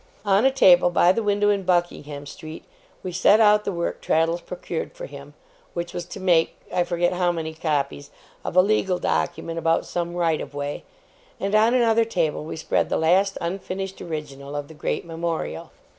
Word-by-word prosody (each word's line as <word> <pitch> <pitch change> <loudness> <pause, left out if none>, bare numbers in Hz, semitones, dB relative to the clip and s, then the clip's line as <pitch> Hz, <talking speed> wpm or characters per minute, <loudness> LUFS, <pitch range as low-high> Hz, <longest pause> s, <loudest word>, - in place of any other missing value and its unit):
On 200 +4 +3
a 270 - +5
table 180 -9 +6
by 175 0 +4
the 230 - 0
window 205 0 +2
in 200 -1 0
Buckingham 175 -5 -1
Street, 155 +2 -9 0.4
we 185 - -4
set 200 +4 +4
out 210 -1 +5
the - - -1
work 170 -2 -3
Traddles 165 +2 +1
procured - - -5
for - - -8
him - - -11 0.4
which 170 0 -4
was 175 - -4
to - - -9
make, 175 -3 +2 0.2
I 175 - +2
forget 175 0 0
how 180 -1 +1
many 160 -2 -4
copies 145 -3 -2 0.3
of - - -5
a 185 - +7
legal 195 -3 +1
document 120 - -2
about 165 0 +1
some 175 0 -3
right 165 -3 +1
of - - -8
way 145 0 -4 0.5
and 200 +1 -2
on 220 +3 +4
another 230 -2 +4
table 170 -10 -1
we 155 - -6
spread 160 0 0
the - - +1
last 190 +5 +2
unfinished 190 +2 -4
original 145 -4 -6
of 145 -1 -4
the - - -10
great 155 - -3
Memorial. 165 - -4
175 Hz, 190 wpm, -24 LUFS, 160-195 Hz, 0.5 s, a